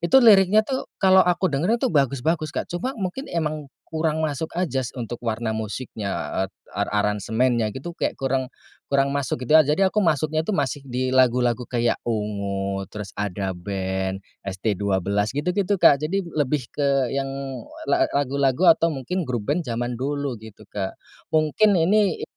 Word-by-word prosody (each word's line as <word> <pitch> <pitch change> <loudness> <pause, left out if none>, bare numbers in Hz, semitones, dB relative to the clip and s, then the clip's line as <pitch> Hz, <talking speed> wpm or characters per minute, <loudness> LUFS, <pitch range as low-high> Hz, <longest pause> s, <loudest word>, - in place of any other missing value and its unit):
Itu 175 +11 +5
liriknya 210 -3 +7
tuh, 265 +1 -2 0.2
kalau 190 -1 +6
aku 180 +1 +2
dengar 175 +12 +2
itu 260 - +2
bagus-bagus 145 +3 +1
Kak - - -3
cuma 175 +10 -2
mungkin 200 +7 -4
emang 155 -3 -2 0.2
kurang 160 -1 -1
masuk 155 +1 -3
aja 135 -8 -1
untuk 120 0 -4
warna 110 0 -1
musiknya, 110 -1 -4 0.4
et - - -22 0.2
eee, 100 - -1
aransemennya 110 +3 +1
gitu 140 +6 -6
kayak - - -1
kurang 135 -1 -1 0.4
kurang 140 0 +3
masuk 130 -3 -2
gitu 150 - +3
aja 155 - +8
jadi 195 +3 +3
aku - - -1
masuknya 155 0 +1
itu - - 0
masih 145 -3 -1
di 130 0 -1
lagu-lagu 125 -1 +3
kayak 120 -1 +2
Ungu, 100 -3 -2
terus 105 -2 -6
Ada 100 -1 -2
Band, 95 +1 -3 0.3
ST12 100 0 0
gitu 150 +4 -1
gitu 200 0 +2
Kak 140 - +7
jadi 175 +6 0
lebih 150 -6 -1
ke 140 -3 +1
yang 135 0 -1 0.6
la 335 -2 +4
lagu-lagu 140 +4 +2
atau 165 0 +1
mungkin 150 +7 -3
grup 120 -5 -3
band 165 +4 +1
zaman 120 +1 -2
dulu 140 0 -2
gitu 110 -2 -13
Kak. 95 -2 -4 0.4
Mungkin 155 +7 +4
ini, 200 +4 +2
135 Hz, 160 wpm, -23 LUFS, 110-160 Hz, 0.6 s, aja